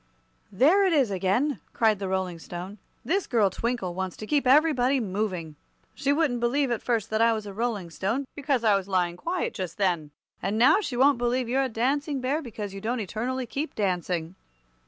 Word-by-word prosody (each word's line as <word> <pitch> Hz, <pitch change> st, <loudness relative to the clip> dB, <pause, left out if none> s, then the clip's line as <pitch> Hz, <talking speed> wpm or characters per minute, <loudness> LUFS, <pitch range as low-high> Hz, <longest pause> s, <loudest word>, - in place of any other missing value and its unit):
"There 310 Hz, -, +4 dB
it 375 Hz, -3 st, +3 dB
is 270 Hz, -9 st, +3 dB
again!" 200 Hz, +10 st, 0 dB
cried 220 Hz, -3 st, +2 dB
the 195 Hz, -, -3 dB
Rolling 185 Hz, -2 st, -2 dB
Stone. 180 Hz, +5 st, -8 dB, 0.3 s
"This 380 Hz, +3 st, 0 dB
girl 215 Hz, -6 st, +2 dB
Twinkle 230 Hz, -5 st, -2 dB
wants 190 Hz, 0 st, -4 dB
to 215 Hz, -, -6 dB
keep 280 Hz, +2 st, +1 dB
everybody 275 Hz, -2 st, +4 dB
moving. 185 Hz, -7 st, -3 dB, 0.4 s
She 280 Hz, -, 0 dB
wouldn't 285 Hz, -5 st, +1 dB
believe, 255 Hz, +3 st, +1 dB
at 235 Hz, -, -1 dB
first, 225 Hz, -3 st, -1 dB
that 220 Hz, +1 st, +1 dB
I 230 Hz, 0 st, +5 dB
was 215 Hz, -1 st, -4 dB
a 200 Hz, -, -7 dB
Rolling 210 Hz, -5 st, -2 dB
Stone, 225 Hz, -, -2 dB
because 280 Hz, -4 st, -1 dB
I 215 Hz, -3 st, +5 dB
was 195 Hz, -1 st, -2 dB
lying 180 Hz, -3 st, 0 dB
quiet 345 Hz, -, -2 dB
just 185 Hz, -5 st, -5 dB
then. 175 Hz, -7 st, 0 dB, 0.3 s
And 200 Hz, +3 st, -1 dB
now 255 Hz, -, +5 dB
she 255 Hz, -, -4 dB
won't 270 Hz, 0 st, +4 dB
believe 245 Hz, +1 st, 0 dB
you're 260 Hz, +3 st, +1 dB
a 265 Hz, -, 0 dB
Dancing 275 Hz, +5 st, 0 dB
Bear, 270 Hz, +5 st, -1 dB
because 210 Hz, -7 st, -6 dB
you 195 Hz, -, -7 dB
don't 235 Hz, +4 st, -1 dB
eternally 240 Hz, +5 st, -3 dB
keep 285 Hz, +6 st, -4 dB
dancing." 180 Hz, -4 st, -1 dB
230 Hz, 200 wpm, -26 LUFS, 190-265 Hz, 0.4 s, I